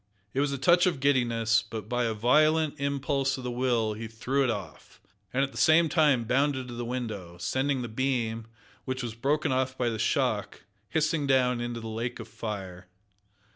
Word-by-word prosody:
It 135 Hz, -, -1 dB
was 145 Hz, 0 st, +1 dB
a 140 Hz, -, -2 dB
touch 175 Hz, +7 st, +4 dB
of 165 Hz, -6 st, 0 dB
giddiness, 120 Hz, -5 st, +2 dB
but 110 Hz, -2 st, -7 dB
by 120 Hz, +1 st, 0 dB
a 110 Hz, -1 st, -1 dB
violent 150 Hz, +6 st, +3 dB
impulse 140 Hz, -1 st, 0 dB
of 130 Hz, -, -7 dB
the 125 Hz, -, -3 dB
will 120 Hz, -3 st, +1 dB
he 110 Hz, +2 st, -6 dB
threw 125 Hz, +5 st, -1 dB
it 130 Hz, -, +1 dB
off, 95 Hz, -8 st, -6 dB, 0.3 s
and 135 Hz, +2 st, +1 dB
at 135 Hz, -, -2 dB
the -, -, -7 dB
same 160 Hz, +1 st, +5 dB
time 150 Hz, -8 st, +3 dB
bounded 130 Hz, +1 st, 0 dB
to -, -, -7 dB
the 120 Hz, 0 st, -4 dB
window, 110 Hz, -8 st, -5 dB
sending 130 Hz, +9 st, -1 dB
the -, -, -4 dB
beam, 115 Hz, -2 st, -1 dB, 0.4 s
which 130 Hz, 0 st, -3 dB
was 120 Hz, -2 st, -4 dB
broken 140 Hz, +6 st, 0 dB
off 130 Hz, 0 st, 0 dB
by 120 Hz, -1 st, +1 dB
the 110 Hz, -1 st, -4 dB
shock, -, -, 0 dB, 0.3 s
hissing 155 Hz, -2 st, 0 dB
down 125 Hz, -2 st, +2 dB
into 120 Hz, 0 st, -3 dB
the 115 Hz, -, -7 dB
lake 115 Hz, +2 st, -4 dB
of -, -, -7 dB
fire. 95 Hz, -4 st, -6 dB
125 Hz, 195 wpm, -28 LUFS, 115-140 Hz, 0.4 s, same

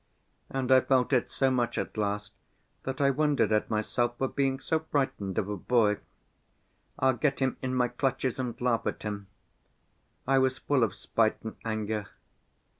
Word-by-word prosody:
And 135 Hz, -1 st, -2 dB
I 130 Hz, 0 st, +8 dB
felt 130 Hz, 0 st, +2 dB
it 125 Hz, -, +2 dB
so 135 Hz, -1 st, +1 dB
much 120 Hz, -2 st, 0 dB
at -, -, -3 dB
last 105 Hz, -1 st, -2 dB, 0.5 s
that 130 Hz, +2 st, -3 dB
I 140 Hz, -1 st, +4 dB
wondered 145 Hz, -3 st, +2 dB
at 105 Hz, 0 st, +2 dB
myself 120 Hz, +2 st, 0 dB
for 135 Hz, -, 0 dB
being 135 Hz, -1 st, 0 dB
so 160 Hz, -, 0 dB
frightened 135 Hz, -, -2 dB
of 100 Hz, -, +1 dB
a 105 Hz, -, -2 dB
boy. 105 Hz, +1 st, +2 dB, 1.0 s
I'll 130 Hz, 0 st, +3 dB
get 140 Hz, +2 st, 0 dB
him 130 Hz, -1 st, 0 dB
in 130 Hz, 0 st, -2 dB
my 125 Hz, -1 st, +2 dB
clutches 135 Hz, -1 st, -1 dB
and 125 Hz, -2 st, -3 dB
laugh 125 Hz, -2 st, +1 dB
at -, -, -3 dB
him. 100 Hz, -2 st, -4 dB, 1.0 s
I 135 Hz, +1 st, +4 dB
was 130 Hz, 0 st, +2 dB
full 140 Hz, -4 st, +1 dB
of 100 Hz, -4 st, 0 dB
spite 110 Hz, +1 st, +1 dB
and 110 Hz, -, -6 dB
anger. 110 Hz, -2 st, -2 dB
125 Hz, 175 wpm, -29 LUFS, 110-135 Hz, 1.0 s, I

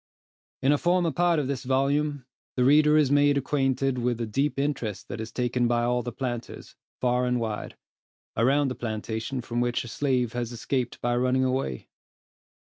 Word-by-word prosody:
In 135 Hz, -, +4 dB
a 145 Hz, -, +3 dB
former 175 Hz, -1 st, +2 dB
part 175 Hz, +2 st, +2 dB
of 145 Hz, -3 st, 0 dB
this 135 Hz, -2 st, -3 dB
volume, 140 Hz, +1 st, 0 dB, 0.3 s
the 125 Hz, -, +2 dB
reader 150 Hz, +3 st, +5 dB
is 145 Hz, -3 st, +3 dB
made 145 Hz, 0 st, +4 dB
acquainted 135 Hz, -1 st, 0 dB
with 120 Hz, -1 st, 0 dB
the 115 Hz, -, -2 dB
deep 135 Hz, +5 st, -1 dB
interest 125 Hz, -9 st, -2 dB
that 110 Hz, -, -5 dB
is 110 Hz, -, -6 dB
taken 125 Hz, -1 st, 0 dB
by 120 Hz, 0 st, +1 dB
all 125 Hz, +1 st, +1 dB
the 120 Hz, 0 st, -5 dB
planters, 120 Hz, -3 st, -5 dB, 0.2 s
far 125 Hz, 0 st, +1 dB
and 125 Hz, 0 st, +1 dB
wide, 110 Hz, -2 st, -4 dB, 0.6 s
around 135 Hz, +5 st, +3 dB
the -, -, -2 dB
plantation 110 Hz, +2 st, -4 dB
from 120 Hz, 0 st, -2 dB
which 120 Hz, 0 st, 0 dB
a -, -, -9 dB
slave 125 Hz, -2 st, 0 dB
has 120 Hz, -1 st, -3 dB
escaped 125 Hz, +1 st, -2 dB
by 120 Hz, 0 st, +1 dB
running 130 Hz, +1 st, +2 dB
away. 130 Hz, -, -2 dB
125 Hz, 180 wpm, -26 LUFS, 120-140 Hz, 0.6 s, reader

